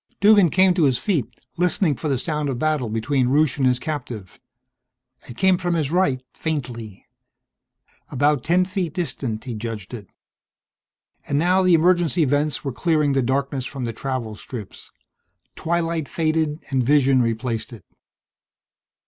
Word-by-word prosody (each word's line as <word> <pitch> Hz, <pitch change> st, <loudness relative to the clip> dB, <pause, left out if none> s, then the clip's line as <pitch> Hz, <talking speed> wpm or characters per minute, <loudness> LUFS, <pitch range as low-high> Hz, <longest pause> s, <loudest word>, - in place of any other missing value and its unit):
Duggan 205 Hz, -3 st, +6 dB
came 185 Hz, +3 st, +4 dB
to 175 Hz, -4 st, +2 dB
his 130 Hz, -3 st, +2 dB
feet, 150 Hz, -, -1 dB, 0.3 s
listening 175 Hz, -3 st, +1 dB
for 155 Hz, -, -5 dB
the 135 Hz, -3 st, +1 dB
sound 150 Hz, +2 st, -2 dB
of 130 Hz, -, -2 dB
battle 150 Hz, -4 st, 0 dB
between 125 Hz, +4 st, 0 dB
Rusche 145 Hz, +2 st, +2 dB
and 130 Hz, -, +3 dB
his 125 Hz, -1 st, +2 dB
captive. 125 Hz, -, -6 dB, 0.9 s
It 120 Hz, -, -10 dB
came 190 Hz, -2 st, +3 dB
from 175 Hz, -2 st, -1 dB
his 155 Hz, -3 st, -1 dB
right, 140 Hz, -8 st, +1 dB
faintly. 120 Hz, -, -5 dB, 1.0 s
About 145 Hz, 0 st, +1 dB
ten 175 Hz, +4 st, +2 dB
feet 185 Hz, -4 st, -3 dB
distant, 130 Hz, -10 st, -3 dB
he 125 Hz, -, -5 dB
judged 110 Hz, -1 st, -6 dB
it. 105 Hz, -5 st, -8 dB, 1.2 s
And 140 Hz, -, 0 dB
now 180 Hz, +5 st, +3 dB
the 185 Hz, -2 st, +5 dB
emergency 170 Hz, -1 st, +3 dB
vents 145 Hz, +2 st, 0 dB
were 135 Hz, -, -2 dB
clearing 155 Hz, -2 st, +1 dB
the 135 Hz, -, +2 dB
darkness 130 Hz, +1 st, -1 dB
from 135 Hz, -2 st, -6 dB
the 115 Hz, -, -3 dB
travel 125 Hz, -2 st, -4 dB
strips. 105 Hz, 0 st, -9 dB, 0.7 s
Twilight 165 Hz, -3 st, -1 dB
faded 155 Hz, -1 st, -1 dB
and 130 Hz, -2 st, +1 dB
vision 135 Hz, -1 st, +4 dB
replaced 115 Hz, +1 st, -2 dB
it. 110 Hz, -7 st, -12 dB
145 Hz, 150 wpm, -22 LUFS, 125-165 Hz, 1.2 s, Duggan